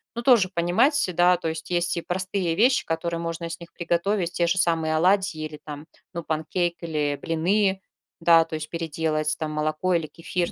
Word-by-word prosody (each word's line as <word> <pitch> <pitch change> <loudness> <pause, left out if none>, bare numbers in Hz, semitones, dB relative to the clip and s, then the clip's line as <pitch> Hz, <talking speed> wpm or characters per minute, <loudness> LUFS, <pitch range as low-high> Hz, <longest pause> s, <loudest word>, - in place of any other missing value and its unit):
Ну, 235 - -3
тоже 235 -7 +4
понимать, 175 - +2 0.2
да, 175 +1 +5
то 165 - -4
есть 160 +2 -5
и 175 -1 0
простые 185 0 -2
вещи, 245 +7 +3
которые 165 +1 -2
можно 165 0 -4
с 170 - -6
них 170 -1 -13
приготовить, 175 +1 -1
те 170 - +1
же 175 +3 +1
самые 165 -3 +1
оладьи 185 0 +2
или 155 -1 -7
там, 150 +1 -8 0.3
ну, 170 -1 -5
панкейк 160 +3 -1
или 150 -3 -1
блины. 190 +4 +1 0.4
Да, 165 -1 +5
то - - -13
есть 155 0 -5
переделать 155 -2 -1
там 155 -2 -2
молоко 155 +4 0
или 165 -2 0
кефир, 170 +2 -3
170 Hz, 185 wpm, -24 LUFS, 160-180 Hz, 0.4 s, да